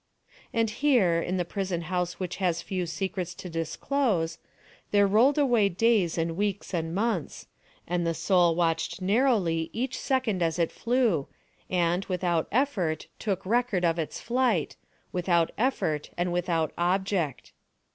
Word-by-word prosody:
And 230 -1 +1
here, 215 -10 +3
in 180 +2 -2
the 175 - 0
prison 185 -2 -3
house 180 +1 -2
which 185 -2 -4
has 175 -3 0
few 185 -2 -3
secrets 180 +1 -3
to 180 - -8
disclose, 165 - -1 0.5
there 205 -1 +4
rolled 230 +9 +4
away 240 -8 +3
days 195 -3 +2
and 165 0 -1
weeks 200 0 -2
and 165 -1 -2
months; 205 -7 -2 0.4
and 175 0 -1
the 165 -1 0
soul 175 -3 +3
watched 165 0 0
narrowly 190 -6 +2
each 250 +3 -2
second 255 -8 0
as 165 -1 +1
it 170 -2 +1
flew, 230 - +1 0.4
and, 175 0 +1
without 175 -3 0
effort, 200 - 0
took 195 -3 -2
record 220 -4 +1
of 165 0 +1
its 160 - -3
flight—without 180 - -1
effort 185 - 0
and 175 0 0
without 170 -3 0
object. 180 -4 0
180 Hz, 140 wpm, -27 LUFS, 170-215 Hz, 0.5 s, there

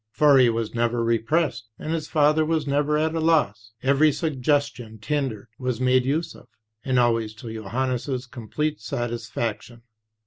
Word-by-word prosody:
For 140 +4 +5
he 125 -2 +6
was 115 -1 -2
never 120 0 0
repressed, 115 +1 0
and 155 - -4
his 160 -2 -3
father 150 +1 +3
was 155 -1 0
never 145 +1 +1
at 155 +1 0
a 165 - -1
loss; 110 -10 +1
every 140 +3 +4
suggestion 140 -6 -1
tendered 115 -1 -3
was 125 -2 -2
made 130 0 +3
use 155 +5 -1
of, - - -16 0.4
and 130 -2 0
always 115 -3 +1
to 110 0 -8
Johannes' 125 +4 -2
complete 140 +5 -4
satisfaction. 120 -2 -4
130 Hz, 150 wpm, -24 LUFS, 115-150 Hz, 0.4 s, he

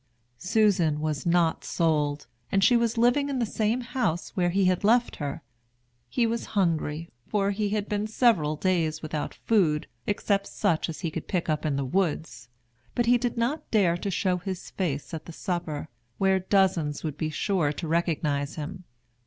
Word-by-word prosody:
Susan 180 -7 +2
was 155 +1 -2
not 170 -1 +2
sold, 150 -3 0 0.3
and 195 0 +3
she 245 - +6
was 235 0 +1
living 245 +5 +3
in 275 - -1
the 240 - +1
same 220 +3 0
house 220 -9 -2
where 175 -2 +2
he 195 +2 +2
had 185 +1 +2
left 235 +3 +3
her. 145 -2 -4 0.7
He 240 - +1
was 230 +1 -1
hungry, 165 -3 0 0.2
for 200 -1 +1
he 205 0 -1
had 210 0 -1
been 210 0 -1
several 215 - +3
days 160 -2 0
without 155 -1 -3
food, 170 -9 +2 0.2
except 200 -1 0
such 175 -5 0
as 160 - -6
he 165 -4 -2
could 165 - -5
pick 175 -3 -1
up 155 0 0
in 145 - 0
the 140 0 -1
woods; 150 -7 -1 0.5
but 240 - +2
he 245 +1 +4
did 245 -1 -2
not 245 +7 -1
dare 190 -6 +3
to 185 +3 -3
show 185 0 +1
his 185 0 -6
face 150 -5 -3
at 160 - -5
the - - -8
supper, 170 -5 -3 0.3
where 190 -1 +3
dozens 185 -6 +1
would 155 -3 -3
be 155 +1 -2
sure 155 -1 0
to 160 +3 -5
recognize 155 -4 0
him. 175 +4 -6
180 Hz, 180 wpm, -27 LUFS, 155-210 Hz, 0.7 s, she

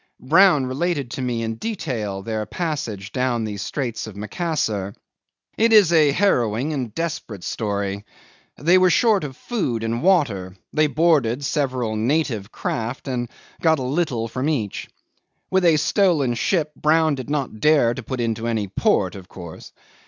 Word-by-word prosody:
Brown 160 +1 +5
related 140 0 -2
to 130 - -4
me 120 -2 -1
in 115 0 -3
detail 115 - -4
their 110 -1 -3
passage 120 - -4
down 125 -3 0
the 105 -2 -4
Straits 120 +2 -3
of 105 - -9
Macassar. 105 - -2 0.6
It 230 +1 +4
is 205 -6 +6
a 155 -3 +5
harrowing 135 - +1
and 125 -6 -3
desperate 150 - -4
story. 100 -2 -3 0.5
They 175 +7 +4
were 185 0 +5
short 215 0 +3
of 135 -3 -6
food 130 - -2
and 115 +1 -2
water; 115 - +1 0.2
they 155 0 +3
boarded 140 -4 +2
several 130 -7 -1
native 115 -3 -1
craft 120 +4 -4
and 120 -2 -2 0.3
got 160 -1 +4
a 130 - -4
little 130 -4 -1
from 130 +5 -2
each. 115 -10 -3 0.6
With 190 0 +3
a 165 -2 +5
stolen 150 - +2
ship 155 - 0
Brown 155 0 +3
did 130 -1 -6
not 140 -7 -2
dare 145 -4 +4
to 130 - -6
put 130 +2 -5
into 115 -1 -1
any 110 -3 -1
port, 95 -1 +1
of 95 -2 -10
course. 85 -3 -10
130 Hz, 160 wpm, -22 LUFS, 110-160 Hz, 0.6 s, is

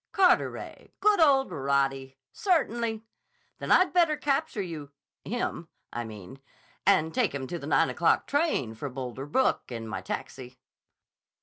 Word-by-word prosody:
"Carteret. 365 -2 +1
Good 420 -2 +4
old 275 -4 +4
Roddy! 135 -1 -1 0.2
Certainly. 235 - 0 0.6
Then - - -4
I'd 370 - +5
better 335 -4 +3
capture 285 -3 -1
you—him, 165 +4 -6 0.3
I 120 - -3
mean, 110 +4 -10 0.5
and 160 -5 +4
take 240 - +1
him 135 -1 -3
to 170 +6 -5
the - - -7
nine - - +3
o'clock - - +2
train 285 - 0
for 125 +6 -6
Boulder 130 +1 -6
Brook, 255 - +1
in 115 -2 -5
my 110 -4 -4
taxi." 125 +6 -6
160 Hz, 135 wpm, -28 LUFS, -, 0.6 s, I'd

